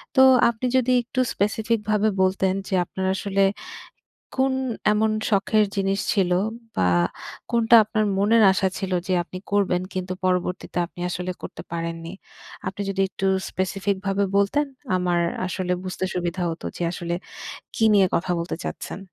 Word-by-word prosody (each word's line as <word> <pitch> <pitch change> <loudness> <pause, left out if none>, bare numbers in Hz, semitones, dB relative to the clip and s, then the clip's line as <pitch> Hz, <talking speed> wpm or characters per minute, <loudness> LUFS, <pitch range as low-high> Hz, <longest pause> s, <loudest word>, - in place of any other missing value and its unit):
তো 265 - +6 0.3
আপনি 235 +2 -4
যদি 255 0 +2
একটু 255 +2 -4
স্পেসিফিক 220 +3 0
ভাবে 215 0 +3
বলতেন, 190 0 +2
যে 195 - -5
আপনার 190 +2 -4
আসলে 195 0 +1 1.0
কোন 265 0 +3 0.4
এমন 220 +1 +2 0.2
শখের 210 +1 +3
জিনিস 195 0 0
ছিল? 190 -3 +1 0.5
বা 90 - +3 0.6
কোনটা 235 0 +5
আপনার 215 0 0
মনের 220 +3 +4
আশা 190 0 +1
ছিল 190 -1 -3 0.2
যে 185 - +1
আপনি 185 - -8
করবেন 190 -3 +2
কিন্তু 185 0 -3
পরবর্তীতে 180 -1 -1
আপনি 175 - -13
আসলে 180 +1 -3
করতে - - -7
পারেননি? 165 0 -4 0.6
আপনি 190 - -7
যদি 195 0 0
একটু 195 0 -3 0.2
স্পেসিফিক 195 +1 -1
ভাবে 195 +1 +1
বলতেন 200 +10 +2 0.3
আমার 180 -1 +1 0.3
আসলে 185 0 -2
বুঝতে 185 0 -3
সুবিধা 180 0 -2
হত 165 - -7
যে - - -4
আসলে 170 -1 -3 0.6
কি 225 - +1
নিয়ে 195 -2 +6
কথা 180 +2 -2
বলতে 170 - -3
চাচ্ছেন। - - -5
195 Hz, 150 wpm, -24 LUFS, 180-210 Hz, 1.0 s, তো